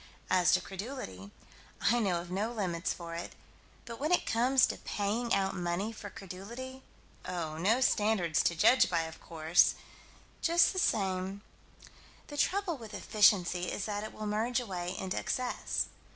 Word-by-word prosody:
As 180 -2 +4
to 185 - +4
credulity, 190 - -7 0.5
I 240 +2 +3
know 190 -6 +1
of 175 +1 -8
no 205 +5 -1
limits 185 -7 -2
for 170 -1 -6
it 170 +1 -5 0.5
but 230 -1 -8
when 305 +4 -1
it 360 - +3
comes 250 +3 +4
to - - -4
paying 220 +4 -2
out 195 0 +2
money 180 +4 -2
for 210 -2 -8
credulity 235 +9 -8 0.4
oh, 160 -3 -4
no 220 +9 +3
standards 205 - +2
to 170 - +2
judge 250 +10 +5
by, 165 - +1
of 160 0 -7
course 160 +1 +3 0.7
just 340 +2 +4
the 375 - -1
same 195 - 0 0.9
The 290 - -7
trouble 365 0 0
with 220 -2 -9
efficiency 180 -4 +3
is 200 - -3
that 205 -1 -3
it 215 - -6
will 215 - -7
merge 220 +4 0
away 180 -6 -4
into 190 0 -2
excess. 255 -1 -1
200 Hz, 160 wpm, -31 LUFS, 180-235 Hz, 0.9 s, judge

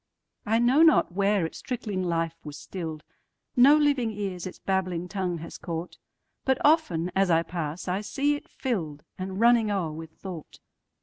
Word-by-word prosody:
I 220 +2 +3
know 245 +6 +4
not 320 - +5
where 200 0 +2
its 160 - -7
trickling 220 -6 -3
life 165 -2 0
was 150 -1 -8
still'd; 160 -4 -6 0.5
No 275 +4 +7
living 285 -6 +2
ears 195 -4 -4
its 185 - -9
babbling 185 -2 -1
tongue 185 -2 -2
has 165 +1 -9
caught; 170 0 -5 0.4
But 265 -1 +2
often, 185 - +3
as 195 -1 +3
I 165 -1 +4
pass, 165 0 -5
I 185 +3 0
see 280 +7 0
it 290 - -7
fill'dAnd 185 - -4
running 235 -1 +5
o'er 190 -6 -1
with 160 +1 -8
thought. 170 0 -9
190 Hz, 165 wpm, -27 LUFS, 165-235 Hz, 0.5 s, No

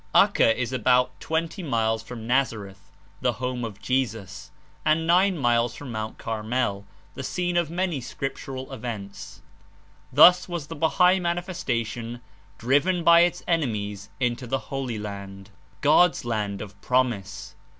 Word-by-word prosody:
Acca - - +5
is 125 0 -3
about 125 +1 +2
twenty 165 +3 -2
miles 115 -7 0
from 115 0 -9
Nazareth, 110 -6 -1 0.3
the - - +1
home 125 -1 -3
of 110 -4 -6
Jesus, 115 -7 -2 0.3
and 155 +1 +2
nine 180 +2 +4
miles 120 -3 +1
from 140 -4 -8
Mt. 110 -1 -5
Carmel, 110 -2 -2 0.3
the - - -6
scene 175 +6 -2
of 170 -3 +1
many 175 -4 -1
scriptural 135 0 -6
events. 110 -5 -7 0.7
Thus 180 +7 +7
was 170 -4 -4
the 165 - -8
Bahai 180 +4 +3
Man 175 0 0
ifestation 120 - -3 0.4
driven 145 +9 +2
by 170 0 +7
its 175 +1 +2
enemies 105 - -1
into 125 0 -1
the 135 +3 -4
Holy 130 -4 -2
Land, 100 -1 -8 0.3
5S - - -33
God's 155 0 +4
Land 105 -4 -2
of 100 -1 -13
Promise. 125 -7 -1
125 Hz, 140 wpm, -25 LUFS, 110-160 Hz, 0.7 s, Thus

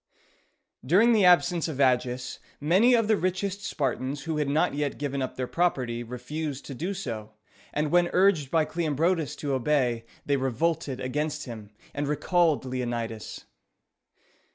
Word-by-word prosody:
During 200 - +5
the 210 -4 +4
absence 175 -1 +4
of 150 -4 -5
Agis, 125 -1 +1 0.2
many 190 - +4
of 230 -2 +2
the 220 - +4
richest 195 +1 -2
Spartans 135 - -2
who 160 0 -2
had 150 -2 0
not 150 +3 +2
yet 145 -1 -2
given 140 -1 -2
up 130 - -3
their 130 - -2
property 125 -7 0
refused 130 +5 -5
to 140 - -7
do 175 +10 -3
so, 110 - -6 0.4
and 150 0 -1
when 175 0 +4
urged 180 -7 +3
by 160 0 +2
Cleombrotus 165 -1 0
to 145 -2 -3
obey, 125 -3 +1 0.2
they 140 -1 +2
revolted 135 +1 -1
against 150 +4 -2
him, 110 -5 -8 0.2
and 145 0 -2
recalled 160 0 +2
Leonidas. 120 -3 -4
145 Hz, 150 wpm, -27 LUFS, 130-170 Hz, 0.4 s, During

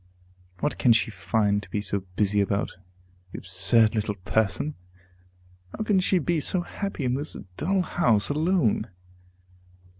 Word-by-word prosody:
What 85 - -1
can 115 +4 +5
she 115 +1 +1
find 100 +2 0
to - - -14
be 105 - -2
so 100 0 -1 0.2
busy 105 0 +2
about, 100 0 -1 0.6
the - - -7
absurd 105 +5 +2
little 105 -2 -1
person? 110 +9 0 1.0
how - - -2
can 205 -3 +2
she 185 +1 +2
be 170 0 0
so 175 +4 +1
happy 175 -4 -4
in 125 - +1
this 145 +4 -2 0.2
dull 190 - 0
house 120 - +2
alone? 150 - +1
115 Hz, 145 wpm, -26 LUFS, 100-165 Hz, 1.0 s, can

